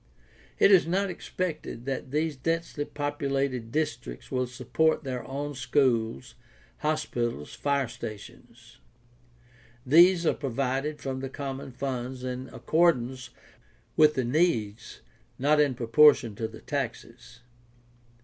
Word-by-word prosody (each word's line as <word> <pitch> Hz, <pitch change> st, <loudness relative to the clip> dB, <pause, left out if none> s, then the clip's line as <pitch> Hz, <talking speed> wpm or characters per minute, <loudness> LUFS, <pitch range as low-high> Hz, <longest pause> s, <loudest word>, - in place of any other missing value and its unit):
It -, -, +6 dB
is 185 Hz, -4 st, +6 dB
not 190 Hz, +2 st, 0 dB
expected 165 Hz, -8 st, -5 dB
that 135 Hz, -1 st, -3 dB
these 155 Hz, +2 st, -1 dB
densely 165 Hz, +1 st, -2 dB
populated 140 Hz, -5 st, -2 dB
districts 135 Hz, -5 st, -3 dB
will 130 Hz, -1 st, 0 dB
support 130 Hz, +7 st, 0 dB
their 130 Hz, -3 st, -4 dB
own 145 Hz, +2 st, -4 dB
schools, 125 Hz, -2 st, 0 dB, 0.5 s
hospitals, 120 Hz, -, -2 dB
fire 140 Hz, -2 st, 0 dB
stations; 110 Hz, -3 st, -10 dB, 1.1 s
these 170 Hz, +5 st, +6 dB
are -, -, +4 dB
provided 135 Hz, +2 st, -2 dB
from 130 Hz, -1 st, -4 dB
the 135 Hz, 0 st, -5 dB
common 135 Hz, -1 st, -6 dB
funds 125 Hz, -1 st, -4 dB
in 130 Hz, 0 st, -5 dB
accordance 130 Hz, -6 st, +1 dB, 0.7 s
with 150 Hz, -1 st, +5 dB
the 130 Hz, -, 0 dB
needs, 120 Hz, -7 st, 0 dB, 0.4 s
not 150 Hz, +3 st, +3 dB
in 145 Hz, -3 st, +3 dB
propor 135 Hz, +6 st, +6 dB
tion 115 Hz, -5 st, -7 dB
to 110 Hz, +2 st, -3 dB
the -, -, -12 dB
taxes. 120 Hz, -3 st, -5 dB
135 Hz, 120 wpm, -27 LUFS, 125-150 Hz, 1.1 s, It